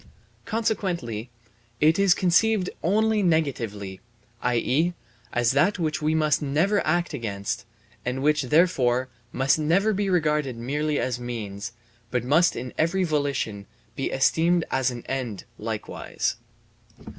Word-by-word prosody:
Consequently 175 - -2 0.5
it 160 +4 +4
is 195 -3 +5
conceived 190 +2 +2
only 215 +4 +2
negatively, 115 - -1 0.4
i.e., 130 +8 +1 0.4
as 120 -1 +2
that 155 +10 +3
which 155 -5 -1
we 155 +1 +1
must 155 -1 +2
never 160 +9 +1
act 175 +1 +1
against 105 -7 -3 0.4
and 125 +2 -2
which, 150 0 +3
therefore, 130 -5 +3 0.2
must 135 +4 +2
never 185 +8 +2
be 200 0 0
regarded 150 -7 +1
merely 145 +5 -1
as 125 -1 -1
means, 115 -2 -5 0.4
but 125 -2 -1
must 155 +7 +3
in 125 0 -5
every 175 +4 +2
volition 140 - -1 0.3
be 135 - -2
esteemed 165 +5 +2
as 130 -1 +2
an 120 -2 -7
end 125 -7 -3 0.2
likewise. - - -3
150 Hz, 125 wpm, -25 LUFS, 125-175 Hz, 0.5 s, is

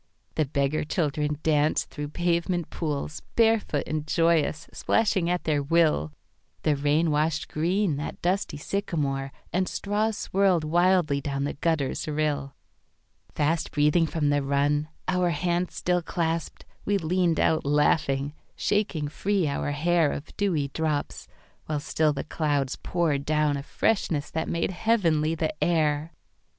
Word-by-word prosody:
The 155 - +1
beggar 140 +2 0
children 150 -2 -1
danced 150 -1 +2
through 145 -1 -5
pavement 170 +1 -1
poolsBarefoot 160 +4 0
and 155 0 -3
joyous, 165 -1 +2
splashing 195 -6 +1
at 180 0 0
their 150 -2 +1
will; 150 - +2 0.5
The 150 - +3
rain 150 +3 +2
washed 155 +1 0
green 175 +1 0
that 145 - -5
dusty 180 -3 -1
sycamoreAnd 150 0 -2
straws 210 +1 -1
swirled 190 -4 +2
wildly 170 -2 +2
down 140 0 -2
the 145 - -2
gutter's 155 -3 -1
rill. 145 -2 -1 0.8
Fast 160 +2 +1
breathing 150 +3 +3
from 150 -2 0
the 145 0 +2
run, 145 +2 +1 0.2
our 180 -1 +2
hands 175 +2 -1
still 180 0 +1
clasped, 165 -1 -3 0.2
We 205 0 +1
leaned 175 -1 +1
out 160 - +2
laughing, 145 -1 +1 0.2
shaking 200 -8 0
free 190 +3 0
our 145 0 -1
hairOf 160 -1 0
dewy 165 -9 0
drops, 155 -1 -2 0.4
while 150 -1 -1
still 155 +1 +1
the 140 -1 -3
clouds 145 -4 -1
poured 160 -6 0
downA 150 -1 +1
freshness 155 -6 0
that 160 0 -2
made 170 +2 0
heavenly 170 -7 +1
the 160 -1 -1
air. 155 -2 +1
155 Hz, 130 wpm, -26 LUFS, 145-175 Hz, 0.8 s, The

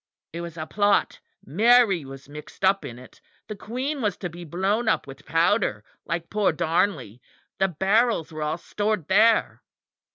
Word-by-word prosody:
It 170 - -5
was 170 -1 -8
a 155 - -4
plot. 205 +3 +1 0.3
Mary 210 - +4
was 135 0 -11
mixed 150 +5 -6
up 195 +1 +3
in 120 - -8
it. 125 0 -16 0.3
The 215 - -6
Queen 260 +8 -4
was 205 -5 -1
to 180 - -5
be 175 +1 -9
blown 195 +8 0
up - - +1
with 135 0 -13
powder, 165 - +1 0.2
like 165 0 -4
poor 210 -2 +2
Darnley. 160 - -1 0.4
The 195 - +3
barrels 195 +1 +1
were 155 - -6
all 150 +2 -1
stored 205 -2 -2
there. 220 +3 +3
185 Hz, 165 wpm, -24 LUFS, 155-210 Hz, 0.4 s, Mary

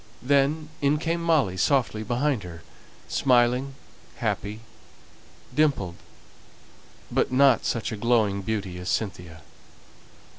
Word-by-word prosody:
Then 145 +3 +2
in 145 +1 +3
came 165 +2 -2
Molly 155 - +2
softly 120 -1 +1
behind 120 +3 0
her, 85 -2 -10 0.4
smiling, 125 +1 +2 0.4
happy, 105 +2 -3 0.9
dimpled; 140 - +1 1.2
but - - +1
not 130 -2 +4
such 115 -3 -1
a 110 - -4
glowing 110 -3 +1
beauty 95 -3 -3
as 90 - -5
Cynthia. 90 -6 -3
120 Hz, 105 wpm, -25 LUFS, 100-140 Hz, 1.2 s, not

